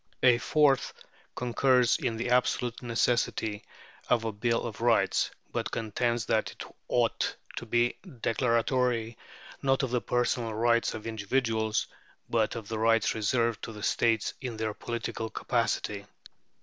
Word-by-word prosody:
A 125 Hz, -2 st, +6 dB
fourth 140 Hz, +2 st, +3 dB, 0.4 s
concurs 125 Hz, 0 st, +3 dB
in 115 Hz, -2 st, -1 dB
the 120 Hz, +2 st, -2 dB
absolute 125 Hz, -1 st, +1 dB
necessity 115 Hz, -3 st, 0 dB, 0.4 s
of 120 Hz, -2 st, +2 dB
a 110 Hz, -, -1 dB
bill 115 Hz, +3 st, 0 dB
of 115 Hz, -1 st, -6 dB
rights, 115 Hz, -5 st, +3 dB, 0.2 s
but 115 Hz, -2 st, -2 dB
contends 115 Hz, +2 st, -1 dB
that -, -, +1 dB
it -, -, -9 dB, 0.2 s
ought -, -, +1 dB, 0.2 s
to 120 Hz, -, -5 dB
be 120 Hz, +1 st, +1 dB, 0.2 s
declaratory 115 Hz, -1 st, +1 dB, 0.5 s
not 135 Hz, 0 st, +2 dB
of 130 Hz, -, -1 dB
the 125 Hz, -1 st, +1 dB
personal 120 Hz, -2 st, 0 dB
rights 115 Hz, +1 st, +2 dB
of 110 Hz, -, -8 dB
individuals, 110 Hz, -1 st, 0 dB, 0.4 s
but 115 Hz, -2 st, +1 dB
of 115 Hz, -3 st, -6 dB
the 110 Hz, 0 st, -3 dB
rights 115 Hz, -1 st, +3 dB
reserved 115 Hz, +1 st, 0 dB
to -, -, -5 dB
the 105 Hz, -1 st, -9 dB
states 115 Hz, -3 st, +1 dB
in 125 Hz, -4 st, -5 dB
their 110 Hz, -1 st, -2 dB
political 115 Hz, 0 st, -4 dB
capacity. 105 Hz, -4 st, -1 dB
115 Hz, 140 wpm, -29 LUFS, 110-120 Hz, 0.5 s, A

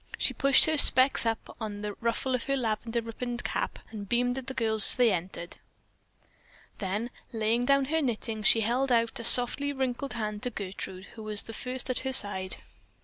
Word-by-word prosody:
She -, -, 0 dB
pushed 275 Hz, -1 st, +4 dB
her 315 Hz, -1 st, +2 dB
"specs" 260 Hz, -3 st, +5 dB
up 225 Hz, 0 st, -4 dB
on 210 Hz, -1 st, -6 dB
the 210 Hz, 0 st, -4 dB
ruffle 235 Hz, +3 st, -2 dB
of 250 Hz, -, -2 dB
her 275 Hz, 0 st, -1 dB
lavender 230 Hz, 0 st, -3 dB
ribboned 240 Hz, +1 st, -6 dB
cap, -, -, -3 dB
and 205 Hz, -3 st, -8 dB
beamed 245 Hz, +2 st, 0 dB
at 260 Hz, -, -12 dB
the 265 Hz, -, -6 dB
girls 220 Hz, -4 st, +2 dB
as -, -, -7 dB
they 245 Hz, -3 st, +3 dB
entered. 175 Hz, -1 st, -5 dB, 1.2 s
Then, 205 Hz, +5 st, -4 dB, 0.2 s
laying 230 Hz, +1 st, -1 dB
down 275 Hz, +1 st, +2 dB
her 320 Hz, +4 st, -1 dB
knitting, 225 Hz, -4 st, -3 dB
she 225 Hz, +1 st, +5 dB
held 250 Hz, +5 st, -1 dB
out 230 Hz, -1 st, +1 dB
a -, -, -6 dB
softly 250 Hz, +4 st, +6 dB
wrinkled 265 Hz, 0 st, -4 dB
hand 215 Hz, -2 st, -5 dB
to 250 Hz, -, -2 dB
Gertrude, 190 Hz, -3 st, -8 dB
who 225 Hz, -, -11 dB
was 215 Hz, -1 st, +1 dB
the 225 Hz, -, -10 dB
first 250 Hz, +3 st, 0 dB
at 255 Hz, -, -3 dB
her 265 Hz, 0 st, -4 dB
side. 190 Hz, -5 st, 0 dB
230 Hz, 195 wpm, -27 LUFS, 215-255 Hz, 1.2 s, softly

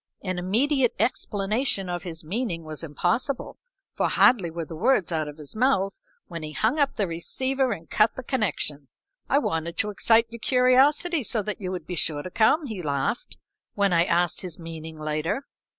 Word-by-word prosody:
An 185 Hz, -2 st, -2 dB
immediate 245 Hz, +8 st, +2 dB
explanation 210 Hz, -2 st, 0 dB
of 175 Hz, -1 st, -3 dB
his 165 Hz, -3 st, -7 dB
meaning 180 Hz, -1 st, -3 dB
was 155 Hz, 0 st, -6 dB
impossible, 225 Hz, -, -1 dB, 0.3 s
for -, -, 0 dB
hardly 195 Hz, -9 st, +4 dB
were 165 Hz, 0 st, -5 dB
the 165 Hz, -, -8 dB
words 205 Hz, 0 st, +2 dB
out 155 Hz, -2 st, -1 dB
of 150 Hz, 0 st, -8 dB
his 150 Hz, +2 st, -11 dB
mouth 215 Hz, -5 st, +1 dB, 0.2 s
when 170 Hz, -4 st, -7 dB
he 155 Hz, 0 st, -6 dB
hung 235 Hz, -, +1 dB
up 280 Hz, -1 st, +2 dB
the 205 Hz, -, +1 dB
receiver 260 Hz, +10 st, -1 dB
and 165 Hz, -6 st, -5 dB
cut 215 Hz, +1 st, +3 dB
the 260 Hz, -, -6 dB
connection. 180 Hz, -, -1 dB, 0.4 s
"I -, -, +4 dB
wanted 165 Hz, -, -1 dB
to 210 Hz, -, +1 dB
excite 225 Hz, +3 st, +4 dB
your 235 Hz, -, -8 dB
curiosity 270 Hz, +7 st, +3 dB
so 220 Hz, -2 st, -1 dB
that 210 Hz, +1 st, -4 dB
you 185 Hz, -, -3 dB
would 180 Hz, -4 st, -5 dB
be 180 Hz, -, -5 dB
sure 150 Hz, -3 st, -1 dB
to 185 Hz, -, -7 dB
come," 260 Hz, -, +3 dB
he 215 Hz, -8 st, -5 dB
laughed, 145 Hz, -, -2 dB, 0.4 s
when 200 Hz, -2 st, +2 dB
I 170 Hz, 0 st, +4 dB
asked 175 Hz, 0 st, +1 dB
his 180 Hz, -4 st, -5 dB
meaning 160 Hz, -1 st, -8 dB
later. 155 Hz, -, -2 dB
190 Hz, 185 wpm, -25 LUFS, 165-245 Hz, 0.4 s, hardly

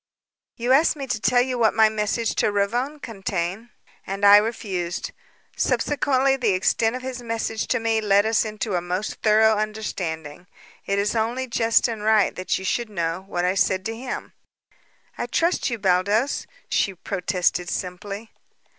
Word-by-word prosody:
"You 240 Hz, +1 st, -1 dB
asked 300 Hz, +5 st, +4 dB
me 280 Hz, -2 st, -5 dB
to 235 Hz, -4 st, -3 dB
tell 245 Hz, +1 st, +4 dB
you 250 Hz, -1 st, -3 dB
what 225 Hz, -2 st, +3 dB
my 220 Hz, -1 st, +6 dB
message 215 Hz, +1 st, -1 dB
to -, -, +2 dB
Ravone 240 Hz, +9 st, -1 dB
contained 195 Hz, -2 st, -4 dB, 0.4 s
and 195 Hz, +1 st, -1 dB
I 200 Hz, 0 st, +10 dB
refused. 195 Hz, -5 st, -2 dB, 0.4 s
Subsequently 275 Hz, -2 st, +1 dB
the 235 Hz, -7 st, +1 dB
extent 225 Hz, +5 st, +1 dB
of 255 Hz, -, -6 dB
his 255 Hz, -1 st, -5 dB
message 225 Hz, -2 st, -3 dB
to 255 Hz, -, +1 dB
me 225 Hz, -1 st, +1 dB
led 205 Hz, -1 st, +3 dB
us 220 Hz, 0 st, +2 dB
into 215 Hz, -1 st, -4 dB
a 175 Hz, -, +1 dB
most 180 Hz, +4 st, -4 dB
thorough 220 Hz, 0 st, +4 dB
understanding. 180 Hz, -7 st, -4 dB, 0.4 s
It 200 Hz, -, 0 dB
is 205 Hz, +3 st, 0 dB
only 235 Hz, +4 st, -1 dB
just 230 Hz, -1 st, +2 dB
and 225 Hz, -3 st, -5 dB
right 215 Hz, -1 st, +3 dB
that 185 Hz, -, -1 dB
you 190 Hz, -, -7 dB
should 235 Hz, +4 st, -1 dB
know 170 Hz, -3 st, -2 dB
what 175 Hz, -2 st, -1 dB
I 180 Hz, -, +2 dB
said 190 Hz, -1 st, +1 dB
to 225 Hz, -, -3 dB
him." 250 Hz, +2 st, -6 dB, 0.9 s
"I -, -, -2 dB
trust 335 Hz, -2 st, +1 dB
you, 235 Hz, -, -2 dB
Baldos," 200 Hz, +6 st, +1 dB, 0.2 s
she 195 Hz, -, 0 dB
protested 180 Hz, -1 st, -1 dB
simply. 200 Hz, +5 st, -5 dB
215 Hz, 165 wpm, -23 LUFS, 190-235 Hz, 0.9 s, I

